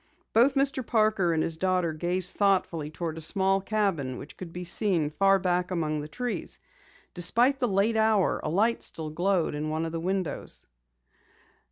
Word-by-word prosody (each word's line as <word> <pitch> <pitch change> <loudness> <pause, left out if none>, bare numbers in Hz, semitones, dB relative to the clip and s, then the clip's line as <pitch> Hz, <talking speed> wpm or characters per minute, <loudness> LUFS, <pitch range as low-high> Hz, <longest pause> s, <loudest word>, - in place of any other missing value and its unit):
Both 255 +5 +4
Mr. 275 -1 0
Parker 215 -6 +1
and 160 -1 0
his 165 -1 -3
daughter 180 -2 0
gazed 180 +3 +1
thoughtfully 185 -6 0
toward 160 0 -5
a - - -8
small 195 +4 +2
cabin 190 - -1
which - - -10
could 180 -3 -9
be 180 +1 -7
seen 175 -4 +3
far 195 +4 +3
back 180 -1 -1
among 155 -4 -2
the 150 - -6
trees. 245 +9 -3 0.6
Despite 240 +10 +3
the 250 - +1
late 205 +2 +1
hour, 220 -3 +2
a - - -2
light 215 +8 +1
still 155 -1 -4
glowed 175 0 0
in 150 +1 -3
one 160 +1 -2
of 165 - -5
the 165 - -4
windows. 185 0 -4
185 Hz, 175 wpm, -27 LUFS, 165-210 Hz, 0.6 s, Both